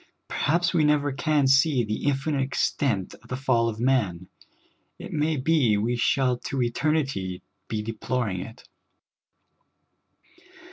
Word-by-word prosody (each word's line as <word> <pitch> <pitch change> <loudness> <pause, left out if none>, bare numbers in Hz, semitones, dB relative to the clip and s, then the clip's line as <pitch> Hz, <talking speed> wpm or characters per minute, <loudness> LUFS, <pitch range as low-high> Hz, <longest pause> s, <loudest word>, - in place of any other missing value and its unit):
Perhaps 170 +3 +1
we 165 -3 +3
never 150 -1 +2
can 150 0 +1
see 135 -1 +4
the 105 +3 -3
infinite 140 0 0
extent 130 -6 -1
of - - -18
the 130 - -3
fall 120 -3 +2
of 110 -1 -6
man; 105 -9 0 0.7
it - - -8
ma}^ 150 -3 0
be 135 -10 +3
we 115 +4 0
shall 125 +1 +1
to 135 - -5
eternit}^ 125 - -1 0.2
be 105 -1 -3
deploring 115 -3 -2
it. 115 +6 -10
130 Hz, 130 wpm, -25 LUFS, 115-145 Hz, 0.7 s, see